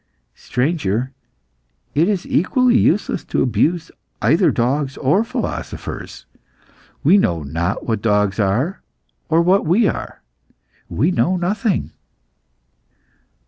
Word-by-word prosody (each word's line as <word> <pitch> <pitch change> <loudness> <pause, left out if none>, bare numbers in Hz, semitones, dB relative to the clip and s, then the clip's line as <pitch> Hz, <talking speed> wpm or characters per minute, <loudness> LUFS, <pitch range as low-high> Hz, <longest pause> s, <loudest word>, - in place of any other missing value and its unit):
"Stranger, 125 - -1 0.8
it 165 +6 +2
is 195 -4 -1
equally 250 - +2
useless 205 -4 +1
to - - 0
abuse 135 - 0 0.3
either - - +3
dogs 135 +3 -1
or 175 +11 +2
philosophers. 230 - -6 0.8
We 200 - +5
know 85 - 0
not 80 +5 -3
what 110 -3 -1
dogs 105 -1 +1
are 115 - 0 0.5
or 165 +1 +3
what 185 +3 +3
we 190 +8 +3
are. - - -5 0.7
We 150 - +1
know 180 +1 +1
nothing." 195 +3 -1
155 Hz, 105 wpm, -19 LUFS, 110-185 Hz, 0.8 s, We